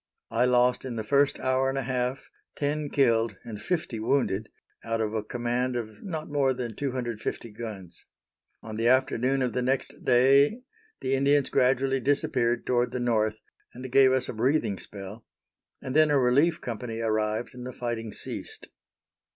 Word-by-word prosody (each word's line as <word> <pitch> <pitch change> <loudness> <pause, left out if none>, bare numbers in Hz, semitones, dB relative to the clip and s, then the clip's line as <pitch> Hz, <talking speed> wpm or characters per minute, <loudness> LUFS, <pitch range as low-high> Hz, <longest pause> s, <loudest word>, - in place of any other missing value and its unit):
I 125 - +3
lost 125 0 +3
in 130 -3 -5
the 110 - -3
first 140 +4 +2
hour 130 +1 +1
and 135 - -2
a 135 - -1
half 125 +1 -2 0.2
ten 145 +1 -1
killed 115 -7 +2
and 105 -2 -8
fifty 155 - -2
wounded, 110 -3 0 0.3
out 115 0 -2
of 110 -1 -1
a 110 - 0
command 120 +2 -2
of 110 -3 -5
not 160 -6 -5
more 140 -3 +1
than 120 -3 -5
250 120 -4 -3
guns. 105 -6 -8 0.6
On 110 -1 -6
the 115 +1 +1
afternoon 130 +1 +2
of 125 - -1
the 125 - 0
next 130 +2 -2
day 140 - +4 0.4
the 130 - -1
Indians 140 +1 +3
gradually 135 +1 +2
disappeared 130 -3 0
toward 120 -1 +1
the 125 - -2
north, 110 -3 0 0.3
and 125 +1 -7
gave 135 0 +6
us 130 -1 +1
a - - -4
breathing 120 -3 +1
spell, 100 +3 -9 0.6
and 130 - -4
then 155 0 +5
a 145 - +4
relief 140 +6 +3
company 115 -1 -5
arrived 110 0 -1
and 125 -1 -9
the 125 - -5
fighting 120 -3 -4
ceased. - - -7
125 Hz, 165 wpm, -27 LUFS, 115-135 Hz, 0.6 s, gave